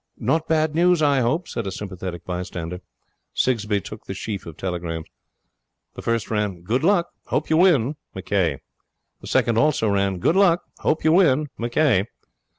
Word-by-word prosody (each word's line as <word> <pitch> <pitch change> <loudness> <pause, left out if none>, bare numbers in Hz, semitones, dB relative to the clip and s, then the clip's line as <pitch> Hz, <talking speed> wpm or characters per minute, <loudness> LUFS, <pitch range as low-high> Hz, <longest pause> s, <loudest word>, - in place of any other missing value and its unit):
'Not 160 0 0
bad 155 -1 +1
news, 175 0 +3
I 140 -2 +4
hope,' 130 +9 0
said 115 - -4
a - - -3
sympathetic 95 -3 -6
bystander. 90 -1 -5 0.5
Sigsbee 105 -5 +1
took 110 +2 -10
the 95 - -5
sheaf 100 -1 -5
of 80 - -9
telegrams. 85 -3 -4 0.9
The - - -8
first 115 -1 -1
ran: 105 -5 -1
'Good 120 - 0
luck. 175 -1 +3 0.2
Hope - - -1
you 160 - +4
win. 155 -6 +3 0.2
McCay.' 95 -5 0 0.6
The - - -11
second 115 -1 +2
also 150 -6 +2
ran: 100 -1 +1
'Good 125 - +1
luck. 180 -3 +4 0.2
Hope 160 - 0
you 160 - +4
win. 155 -5 +4
McCay.' 120 -3 +2
115 Hz, 160 wpm, -23 LUFS, 95-155 Hz, 0.9 s, I